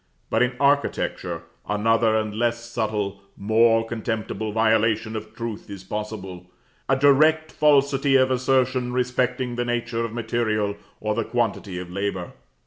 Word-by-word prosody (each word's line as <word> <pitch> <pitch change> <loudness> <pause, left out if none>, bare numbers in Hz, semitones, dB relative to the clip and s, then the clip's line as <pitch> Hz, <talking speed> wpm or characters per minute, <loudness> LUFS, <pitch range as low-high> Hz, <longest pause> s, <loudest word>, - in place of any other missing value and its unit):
But - - +2
in 125 +1 +2
architecture 140 0 0 0.3
another 110 +1 +2
and 110 -1 -2
a - - -8
less 120 +1 -1
subtle, 105 -4 -2 0.2
more 115 +2 +3
contemptible, 110 -1 -3
violation 110 0 +2
of 110 0 -7
truth 115 -3 -6
is 100 -2 -8
possible; 95 -3 -6 0.4
a 135 - +5
direct 155 +3 +4
falsity 140 -2 +3
of 130 0 +4
assertion 130 -1 +1
respecting 125 0 -1
the 120 - 0
nature 120 -1 -1
of 115 - -3
material, 110 -3 -1 0.2
or 105 0 -1
the 115 +1 -1
quantity 110 -5 -2
of 90 -1 -7
labor. 95 -1 -3
115 Hz, 140 wpm, -24 LUFS, 105-125 Hz, 0.4 s, a